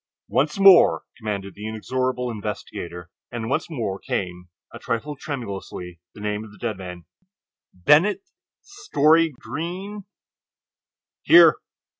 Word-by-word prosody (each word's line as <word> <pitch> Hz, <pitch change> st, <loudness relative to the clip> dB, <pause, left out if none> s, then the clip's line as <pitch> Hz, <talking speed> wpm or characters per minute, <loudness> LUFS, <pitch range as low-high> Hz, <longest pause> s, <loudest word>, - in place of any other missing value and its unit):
"Once 150 Hz, +6 st, +1 dB
more," 195 Hz, -3 st, +7 dB
commanded 100 Hz, -4 st, -5 dB
the 105 Hz, +1 st, -7 dB
inexorable 125 Hz, +3 st, -2 dB
investigator, 90 Hz, -5 st, -6 dB, 0.2 s
and 115 Hz, -1 st, -4 dB
once 165 Hz, -, -1 dB
more 110 Hz, -, -3 dB
came—a 90 Hz, -1 st, -6 dB
trifle 140 Hz, +6 st, -3 dB
tremulously—the 95 Hz, -, -7 dB
name 105 Hz, 0 st, -3 dB
of 110 Hz, -, -12 dB
the -, -, -16 dB
dead 115 Hz, -3 st, -3 dB
man: 90 Hz, -2 st, -9 dB, 0.7 s
"Bennett 150 Hz, -, +3 dB, 0.4 s
Story 165 Hz, -, +2 dB
Greene." 180 Hz, +8 st, -6 dB, 1.2 s
"Here!" 345 Hz, +2 st, +7 dB
115 Hz, 105 wpm, -23 LUFS, 100-155 Hz, 1.2 s, more